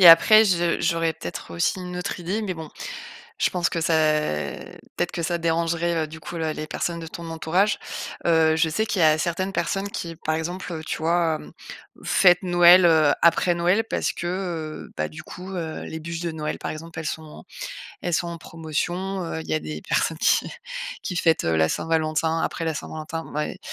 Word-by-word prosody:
et 175 Hz, -, +10 dB
après 215 Hz, +7 st, +9 dB
je 175 Hz, -4 st, +2 dB
j'aurais 165 Hz, -2 st, +1 dB
peut-être 90 Hz, -, -7 dB
aussi 85 Hz, -, +1 dB
une 180 Hz, 0 st, -6 dB
autre 180 Hz, +1 st, -3 dB
idée, 190 Hz, +6 st, -2 dB
mais 200 Hz, -3 st, -2 dB
bon, 160 Hz, -2 st, -7 dB, 0.7 s
je -, -, +2 dB
pense 175 Hz, -2 st, 0 dB
que 170 Hz, -, -2 dB
ça 165 Hz, 0 st, +2 dB, 1.0 s
peut-être -, -, -1 dB
que 170 Hz, -, -2 dB
ça 170 Hz, +1 st, 0 dB
dérangerait, 170 Hz, 0 st, 0 dB
heu, 155 Hz, -, -4 dB
du 160 Hz, +1 st, -10 dB
coup, 170 Hz, -, -8 dB
la 160 Hz, -1 st, -1 dB
les 155 Hz, -, -5 dB
personnes 170 Hz, +2 st, -2 dB
de 165 Hz, -, -7 dB
ton 170 Hz, +1 st, -7 dB
entourage. 170 Hz, +6 st, +1 dB, 0.5 s
Heu, 160 Hz, -1 st, +4 dB
je 160 Hz, -, +3 dB
sais 220 Hz, +8 st, 0 dB
qu'il 195 Hz, -4 st, 0 dB
y -, -, +7 dB
a 155 Hz, 0 st, +5 dB
certaines 185 Hz, +4 st, -1 dB
personnes 195 Hz, +4 st, -1 dB
qui, 170 Hz, -4 st, -5 dB
par 155 Hz, -1 st, -1 dB
exemple, 175 Hz, +2 st, -4 dB
heu, 160 Hz, -1 st, -5 dB
tu -, -, -2 dB
vois, 165 Hz, -1 st, +2 dB
hem, -, -, -12 dB, 0.5 s
fêtent 180 Hz, -1 st, +5 dB
Noël, 175 Hz, 0 st, +7 dB
heu, 155 Hz, -3 st, +5 dB
après 170 Hz, +1 st, +4 dB
Noël 180 Hz, +6 st, +2 dB
parce -, -, 0 dB
que, 175 Hz, -, -5 dB
heu, 175 Hz, -4 st, -4 dB
bah, 75 Hz, -, 0 dB
du 75 Hz, -, -10 dB
coup, 185 Hz, +2 st, -9 dB
heu, 160 Hz, -3 st, -4 dB
les 160 Hz, -, -6 dB
buches 165 Hz, +1 st, -5 dB
de 170 Hz, -1 st, -2 dB
Noël, 155 Hz, -1 st, -3 dB
par -, -, -4 dB
exemple, 160 Hz, +1 st, -8 dB
elles 160 Hz, -, -5 dB
sont 155 Hz, 0 st, -6 dB, 0.6 s
elles 175 Hz, -, 0 dB
sont 175 Hz, -, 0 dB
en 170 Hz, -, -5 dB
promotion, 175 Hz, +4 st, -3 dB
heu, 80 Hz, -, -4 dB
il 80 Hz, -, -9 dB
y 80 Hz, -, 0 dB
a 80 Hz, -, +1 dB
des 75 Hz, 0 st, -6 dB
personnes 160 Hz, -, +1 dB
qui -, -, +3 dB, 0.5 s
qui 180 Hz, -, -4 dB
fêtent, 165 Hz, -1 st, +3 dB
heu, 80 Hz, -1 st, +2 dB
la 80 Hz, 0 st, +3 dB
Saint-Valentin 160 Hz, 0 st, 0 dB
après 165 Hz, -, -2 dB
la 160 Hz, -, 0 dB
Saint-Valentin, 160 Hz, +1 st, -5 dB
bon, -, -, -12 dB
bah 150 Hz, +1 st, -1 dB
et -, -, -8 dB
165 Hz, 215 wpm, -24 LUFS, 160-175 Hz, 1.0 s, et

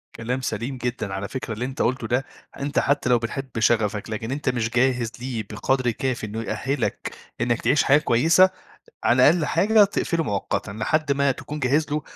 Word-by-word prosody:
كلام 125 Hz, +3 st, -3 dB
سليم 125 Hz, +2 st, -3 dB
جدًا. 120 Hz, -5 st, -3 dB
على 95 Hz, +1 st, -3 dB
فكرة 125 Hz, -2 st, -5 dB
اللي 120 Hz, +4 st, -3 dB
أنت 130 Hz, +1 st, -4 dB
قُلته 125 Hz, -1 st, 0 dB
ده، 125 Hz, +3 st, 0 dB, 0.3 s
أنت 140 Hz, +1 st, 0 dB
حتّى 145 Hz, -2 st, +1 dB
لو 120 Hz, -, +5 dB
بتحب 130 Hz, +4 st, -4 dB
شغفك، 110 Hz, -2 st, +1 dB
لكن 110 Hz, +2 st, -4 dB
أنت 140 Hz, -1 st, -1 dB
مش 120 Hz, -2 st, -1 dB
جاهز 125 Hz, -1 st, +1 dB
ليه 120 Hz, -3 st, -4 dB
بقدر 125 Hz, +3 st, 0 dB
كافي 125 Hz, 0 st, -3 dB
إنه 110 Hz, +1 st, -5 dB
يأهّلك 135 Hz, +4 st, -2 dB, 0.3 s
إنّك 120 Hz, 0 st, 0 dB
تعيش 135 Hz, +5 st, +3 dB
حياة 140 Hz, -, +5 dB
كويسة، 155 Hz, +7 st, +4 dB
أ 190 Hz, -, -1 dB, 0.5 s
على 125 Hz, +1 st, +4 dB
أقل 160 Hz, +1 st, +4 dB
حاجة 210 Hz, +8 st, +4 dB
تقفله 195 Hz, -4 st, 0 dB
مؤقتًا، 100 Hz, -2 st, -2 dB
لحد 140 Hz, +9 st, 0 dB
ما 140 Hz, 0 st, +2 dB
تكون 150 Hz, +3 st, -7 dB
جاهز 145 Hz, +4 st, +1 dB
له 150 Hz, 0 st, 0 dB
125 Hz, 190 wpm, -23 LUFS, 115-140 Hz, 0.5 s, لو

